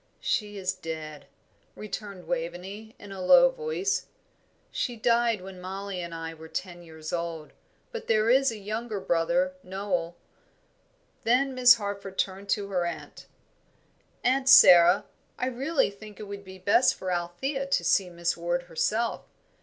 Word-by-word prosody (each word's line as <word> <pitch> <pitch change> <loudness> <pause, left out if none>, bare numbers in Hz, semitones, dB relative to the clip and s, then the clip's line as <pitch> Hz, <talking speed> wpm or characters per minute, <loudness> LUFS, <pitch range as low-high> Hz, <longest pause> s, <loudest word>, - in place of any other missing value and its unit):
"She 210 -2 -2
is 185 -1 -1
dead," 155 -2 -7 0.5
returned 200 -3 -7
Waveney, 180 +6 -5
in 205 - -12
a 195 -1 -7
low - - +7
voice; 465 -5 -2 0.6
"she 245 - -2
died 230 -2 +2
when 185 -1 -10
Mollie 190 0 -5
and 170 -1 -6
I 165 0 -6
were 160 0 -12
ten 175 +1 -6
years 160 -2 -9
old, 170 -3 -4 0.4
but 465 -2 -7
there 215 -1 +2
is 265 +2 +4
a 225 - -7
young 215 +3 -4
brother, 220 +7 0
Noel." 185 -5 -3 1.1
Then 260 +4 +2
Miss 250 -1 +7
Harford 200 -3 -6
turned 195 +1 -2
to 200 0 0
her 180 -3 0
aunt. 170 - -8 1.0
"Aunt 260 +1 +2
Sara, 175 -5 +8 0.3
I - - -1
really 265 +2 0
think 210 +1 -13
it - - -6
would 200 0 -7
be 190 -1 -11
best 230 +8 +3
for 185 -1 -4
Althea 225 +12 -2
to 275 - +1
see 190 -3 +2
Miss 170 0 -1
Ward 175 +1 -2
herself. 215 +7 -1
200 Hz, 150 wpm, -27 LUFS, 175-235 Hz, 1.1 s, Sara